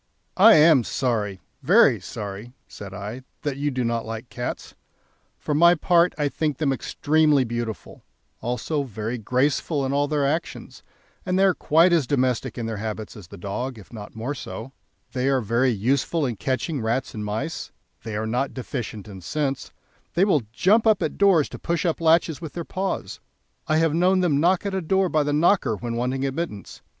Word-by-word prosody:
"I 220 +4 +8
am 150 -4 +6
sorry, 105 -7 -2 0.2
very - - +5
sorry," 105 +4 -7
said 100 -1 -10
I, 105 +5 -6 0.2
"that 145 -3 -2
you 145 +1 0
do 130 -2 -2
not 115 -1 -1
like 115 +2 -7
cats. 120 - -5 0.6
For 150 - -3
my 170 +4 +6
part, 170 +1 +3
I 145 -1 +1
think 150 -1 -2
them 145 -4 +1
extremely 150 +1 +2
beautiful, 120 -2 -5 0.4
also 125 +5 -2
very 115 -1 -4
graceful 135 +5 0
in 135 - -1
all 145 +1 +2
their 145 -1 0
actions, 155 +5 -3 0.4
and 185 0 -1
they 190 - +4
are 195 -1 +5
quite 165 +3 +3
as 160 -7 +2
domestic 130 -3 0
in 120 - -3
their 110 -1 -3
habits 110 0 -5
as 100 -6 -11
the 100 - -11
dog, 115 +7 -4
if 105 +2 -14
not 105 -2 -9
more 115 +6 -3
so. 120 -1 -7 0.4
They 130 +1 0
are 135 -1 +2
very 120 +3 +1
useful 130 - 0
in 120 -3 -2
catching 135 - -2
rats 115 +4 -1
and 105 - -5
mice; 110 +10 -4 0.3
they 110 -2 -6
are 110 +1 -2
not 125 +5 -2
deficient 120 -5 -5
in 95 -3 -10
sense; 140 - -3 0.4
they 180 +3 +4
will 170 -9 +3
jump 215 - +3
up 210 -5 +4
at 155 - -3
doors 190 -7 +4
to - - -9
push 170 +1 -1
up 165 -1 0
latches 165 -1 +3
with 160 -3 -7
their 170 -2 -5
paws. 190 +1 -3 0.5
I 155 -1 +2
have 165 -1 +2
known 185 +3 +3
them 155 -6 +2
knock 180 +5 +2
at 200 - -2
a 190 - -1
door 190 +2 +1
by 155 -2 +2
the 145 0 0
knocker 150 - +3
when 115 +2 -5
wanting 130 +3 -1
admittance. 135 - -5
135 Hz, 190 wpm, -24 LUFS, 115-160 Hz, 0.6 s, I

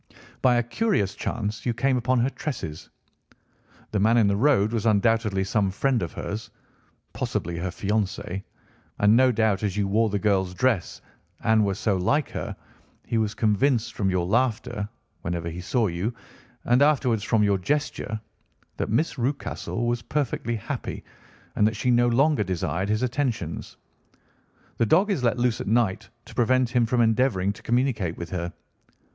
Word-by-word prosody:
By 125 -1 +4
a 120 - +2
curious 120 - 0
chance 105 0 -3
you 120 -2 -1
came 130 +2 +2
upon 125 +1 +1
her 125 - +2
tresses. 80 - -5 1.0
The 105 - 0
man 110 +4 +4
in 115 - +5
the 100 0 +2
road 110 -3 +3
was 115 -1 0
undoubtedly 105 -1 +2
some 100 0 +1
friend 125 +5 0
of 85 - -3
hers—possibly 85 -5 -6
her 90 +2 -2
fiancé—and 100 +1 -2
no 130 +1 +5
doubt, 110 -3 +1
as 105 -2 -2
you 100 -1 +1
wore 110 +3 +2
the 105 - 0
girl's 95 -3 +1
dress 115 -5 0 0.4
and 110 -1 +4
were 100 -1 0
so 100 0 0
like 140 +11 +1
her, - - -4 0.5
he 115 - 0
was 105 -1 -1
convinced 115 +3 +1
from 100 -2 0
your 90 -2 0
laughter, 115 0 0 0.3
whenever 85 -1 -3
he 90 +2 -6
saw 115 +6 +1
you, 95 +5 -2 0.5
and 125 +3 +3
afterwards 130 -7 +3
from 110 -1 +2
your 100 -2 +2
gesture, 145 -2 -2 0.6
that - - -2
Miss 145 +5 0
Rucastle 120 -2 -2
was 120 0 0
perfectly 125 -5 -2
happy, 105 - -5 0.5
and 105 - +4
that 110 - -1
she 125 +4 +1
no 120 0 +4
longer 135 +1 +3
desired 95 +1 -2
his 110 +3 +1
attentions. 125 - -2 1.0
The 115 - +3
dog 190 - +4
is 150 -10 -1
let 120 0 +2
loose 120 -2 +1
at - - -6
night 110 -3 +1 0.2
to - - -13
prevent 125 0 +2
him 120 -1 +2
from 120 +1 +2
endeavouring 110 -4 +2
to - - -15
communicate 120 -8 0
with 85 -1 -7
her. 85 -1 -3
110 Hz, 165 wpm, -25 LUFS, 100-125 Hz, 1.0 s, in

